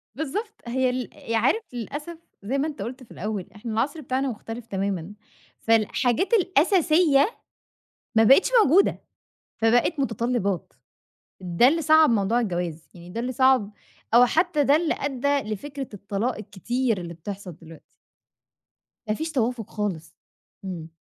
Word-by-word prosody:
بالضبط، 360 Hz, -, -4 dB
هي 255 Hz, +1 st, +1 dB
ال 250 Hz, 0 st, -3 dB, 0.2 s
ي 230 Hz, -, +1 dB
عارف، 265 Hz, -, +2 dB
للأسف 295 Hz, +8 st, -6 dB, 0.3 s
زي 255 Hz, +7 st, -1 dB
ما 290 Hz, +3 st, 0 dB
أنت 285 Hz, -10 st, -7 dB
قُلت 250 Hz, +5 st, -6 dB
في -, -, -19 dB
الأول، 210 Hz, -4 st, -4 dB
إحنا 220 Hz, +2 st, -6 dB
العصْر 280 Hz, +8 st, -1 dB
بتاعنا 265 Hz, 0 st, -1 dB
مختلِف 225 Hz, 0 st, -7 dB
تمامًا، 195 Hz, -1 st, -3 dB, 0.5 s
فالحاجات 230 Hz, -, +1 dB
الأساسية 350 Hz, -, +3 dB, 0.8 s
ما 225 Hz, -, +6 dB
بقِتش 270 Hz, -, +6 dB
موجودة، 360 Hz, +8 st, +3 dB, 0.6 s
فبقِت 245 Hz, +7 st, +2 dB
متطلّبات، 230 Hz, -7 st, -1 dB, 0.7 s
ده 180 Hz, +6 st, +3 dB
اللي 325 Hz, +4 st, +1 dB
صعّب 315 Hz, -1 st, +6 dB
موضوع 225 Hz, +2 st, +2 dB
الجواز، 175 Hz, -6 st, -3 dB
يعني 175 Hz, 0 st, -12 dB
ده 230 Hz, -, -4 dB
اللي 250 Hz, +2 st, -3 dB
صعّب، 260 Hz, -5 st, +3 dB, 0.4 s
أو 245 Hz, +1 st, +8 dB
حتى 320 Hz, +1 st, +1 dB
ده 280 Hz, +2 st, +5 dB
اللي 325 Hz, 0 st, 0 dB
أدّى 285 Hz, +1 st, 0 dB
لفكرة 275 Hz, +5 st, -6 dB
الطلاق 205 Hz, +5 st, -3 dB
الكتير 225 Hz, +3 st, -2 dB
اللي 170 Hz, -1 st, -7 dB
بتحصَل 185 Hz, 0 st, -8 dB
دلوقتي 165 Hz, -1 st, -14 dB, 1.3 s
ما 215 Hz, -, +1 dB
فيش 315 Hz, +7 st, -4 dB
توافُق 240 Hz, -5 st, -1 dB
خالص، 185 Hz, -7 st, -4 dB, 0.5 s
إمم. 165 Hz, -4 st, -6 dB
245 Hz, 140 wpm, -24 LUFS, 205-285 Hz, 1.3 s, أو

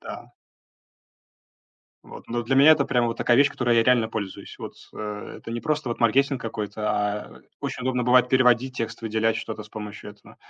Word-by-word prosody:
да. -, -, -10 dB, 1.7 s
Вот, -, -, -12 dB
ну, 120 Hz, 0 st, -2 dB
для 130 Hz, +4 st, 0 dB
меня 140 Hz, +4 st, +8 dB
это 145 Hz, -3 st, +2 dB
прям 120 Hz, -2 st, +1 dB
вот 115 Hz, 0 st, -3 dB
такая 120 Hz, -, +2 dB
вещь, 140 Hz, +2 st, +5 dB
которой 120 Hz, -3 st, +1 dB
я -, -, +5 dB
реально 120 Hz, -2 st, +3 dB
пользуюсь, 100 Hz, -4 st, -6 dB
вот, -, -, -8 dB, 0.2 s
а. 105 Hz, -1 st, -5 dB
Это -, -, -10 dB
не 115 Hz, 0 st, -3 dB
просто 150 Hz, -4 st, -1 dB
вот 120 Hz, -, -4 dB
маркетинг 135 Hz, +4 st, +3 dB
какой-то, 105 Hz, -1 st, -4 dB
а 105 Hz, 0 st, -3 dB, 0.2 s
очень -, -, -4 dB
удобно 125 Hz, -1 st, 0 dB
бывает 125 Hz, +1 st, +4 dB
переводить 130 Hz, 0 st, +3 dB
текст, 115 Hz, -2 st, -4 dB
выделять 110 Hz, 0 st, 0 dB
что-то 110 Hz, -, -6 dB
с 105 Hz, -, -16 dB
помощью 105 Hz, -1 st, -8 dB
этого 105 Hz, -, -18 dB
120 Hz, 190 wpm, -24 LUFS, 110-130 Hz, 1.7 s, меня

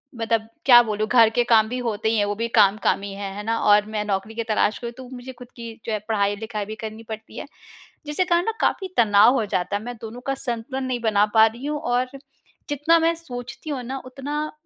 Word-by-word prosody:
मतलब 225 Hz, -1 st, -1 dB, 0.2 s
क्या 240 Hz, -3 st, +9 dB
बोलूँ, 215 Hz, -1 st, -2 dB
घर 230 Hz, -1 st, +6 dB
के 240 Hz, +2 st, +1 dB
काम 225 Hz, -2 st, +4 dB
भी 250 Hz, -, -3 dB
होते 220 Hz, 0 st, -1 dB
ही 225 Hz, -, +1 dB
हैं, 205 Hz, -, +2 dB
वो 205 Hz, 0 st, -2 dB
भी 230 Hz, +2 st, -2 dB
काम, 200 Hz, 0 st, +5 dB
काम 195 Hz, -, +2 dB
ही 200 Hz, 0 st, -6 dB
हैं, 195 Hz, 0 st, -5 dB
है 205 Hz, -, -6 dB
ना। 225 Hz, +1 st, 0 dB
और 210 Hz, 0 st, +4 dB
मैं 210 Hz, -, 0 dB
नौकरी 200 Hz, +2 st, -3 dB
के 230 Hz, -, -2 dB
तलाश 215 Hz, -1 st, +1 dB
में 235 Hz, -, -3 dB
हूँ, -, -, -11 dB
तो 260 Hz, -1 st, -10 dB
मुझे 250 Hz, +1 st, -8 dB
ख़ुद 250 Hz, 0 st, -12 dB
की 230 Hz, -1 st, -7 dB
जो 230 Hz, -, -3 dB
है 215 Hz, -, 0 dB
पढ़ाई-लिखाई 210 Hz, 0 st, -1 dB
भी 215 Hz, +2 st, -7 dB
करनी 220 Hz, +1 st, -8 dB
पड़ती 220 Hz, 0 st, -8 dB
है, -, -, -5 dB, 0.6 s
जिसके 295 Hz, +5 st, 0 dB
कारण 345 Hz, 0 st, +2 dB
ना 450 Hz, -, +1 dB
काफ़ी 385 Hz, -, +1 dB
तनाव 215 Hz, +1 st, +6 dB
हो 230 Hz, -5 st, +1 dB
जाता 185 Hz, -1 st, -2 dB
है, -, -, -8 dB
मैं 245 Hz, +1 st, -6 dB
दोनों 230 Hz, +2 st, -8 dB
का 275 Hz, -, +1 dB
संतुलन 245 Hz, +2 st, -3 dB
नहीं 255 Hz, -1 st, -2 dB
बना 210 Hz, -2 st, +3 dB
पा 220 Hz, 0 st, +8 dB
रही 235 Hz, +4 st, -7 dB
हूँ। 295 Hz, 0 st, -2 dB
और 245 Hz, -3 st, 0 dB, 0.6 s
जितना 295 Hz, +4 st, +3 dB
मैं 330 Hz, +1 st, +2 dB
सोचती 305 Hz, -1 st, -8 dB
हूँ 265 Hz, -4 st, -3 dB
ना, 265 Hz, +3 st, -5 dB
उतना 290 Hz, +4 st, -4 dB
230 Hz, 245 wpm, -23 LUFS, 215-255 Hz, 0.6 s, क्या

